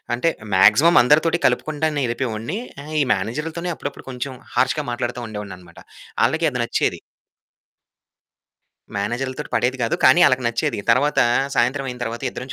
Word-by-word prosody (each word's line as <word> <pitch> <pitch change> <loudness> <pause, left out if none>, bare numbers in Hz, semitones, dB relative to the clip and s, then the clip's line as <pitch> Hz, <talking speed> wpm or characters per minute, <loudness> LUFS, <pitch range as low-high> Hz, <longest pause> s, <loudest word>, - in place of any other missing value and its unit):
అంటే 165 +8 +1 0.2
మాక్సిమం 110 - +6
అందరితోటి 160 +6 +3
కలుపుకుంటానే 150 -2 -1
ఎళిపోయెవాడిని. 120 - -3 0.2
ఆహ్, 155 +2 -9
ఈ - - +4
మేనేజర్‌లతోనే 150 - -3
అప్పుడప్పుడు 140 -2 -7
కొంచెం 130 +1 -5 0.2
హార్ష్‌గా 145 +3 +1
మాట్లాడతా 120 0 -3
ఉండేవాడినన్నమాట. 95 -5 -9 0.5
ఆళ్ళకీ - - +1
అది - - -4
నచ్చేది. - - -1 2.0
మేనేజర్‌లతోటి 130 +8 -3
పడేది 125 +2 +1
గాదు. 115 - 0
కానీ 175 - +6
ఆళ్ళకి 130 -1 +1
నచ్చేది. 120 +1 -2
తరువాత 140 +5 +3 0.4
సాయంత్రం 135 +3 +1
అయిన 125 - -6
తరువాత 115 0 -4
ఇద్దరం 125 - -8
130 Hz, 130 wpm, -21 LUFS, 115-150 Hz, 2.0 s, మాక్సిమం